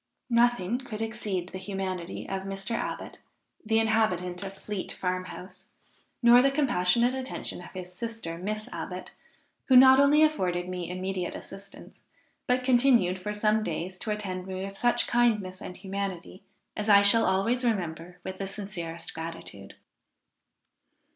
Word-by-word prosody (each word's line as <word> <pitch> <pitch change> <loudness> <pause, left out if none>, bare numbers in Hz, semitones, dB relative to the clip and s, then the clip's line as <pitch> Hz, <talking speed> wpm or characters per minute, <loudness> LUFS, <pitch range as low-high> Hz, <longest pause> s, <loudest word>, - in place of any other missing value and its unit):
Nothing 240 -2 +2
could 240 -5 -7
exceed 205 -5 -3
the 185 - -7
humanity 185 -2 -4
of 195 0 -3
Mr. 195 +2 -5
Abbot, 230 - -4 0.4
the 220 0 +1
inhabitant 215 -5 +1
of 195 0 -7
Fleet 205 -1 -5
farm 185 0 -2
house, 180 +2 -10 0.6
nor 240 +1 +8
the 275 - +4
compassionate 245 -4 +2
attention 260 -8 -4
of 175 - -11
his 180 -1 -8
sister, 200 -5 -5
Miss 215 +3 -3
Abbot, - - -6 0.5
who 260 - +4
not 260 +1 +9
only 290 +2 +6
afforded 180 - +1
me 180 -2 -4
immediate 185 0 -3
assistance, 195 +1 -11 0.5
but 250 0 +2
continued 240 -8 +4
for 210 - -3
some 210 +1 +2
days 185 0 -4
to - - -5
attend 190 -3 -3
me 190 0 -4
with 195 0 -8
such 240 +3 +2
kindness 210 -6 +1
and 180 - -8
humanity, 190 -1 -5 0.3
as 210 +1 -2
I 200 -1 +8
shall 225 +3 +7
always 230 +7 +1
remember 180 -6 -2
with 190 0 -6
the 195 - -3
sincerest 175 -5 -6
gratitude." 160 -12 -8
195 Hz, 145 wpm, -28 LUFS, 185-230 Hz, 0.6 s, not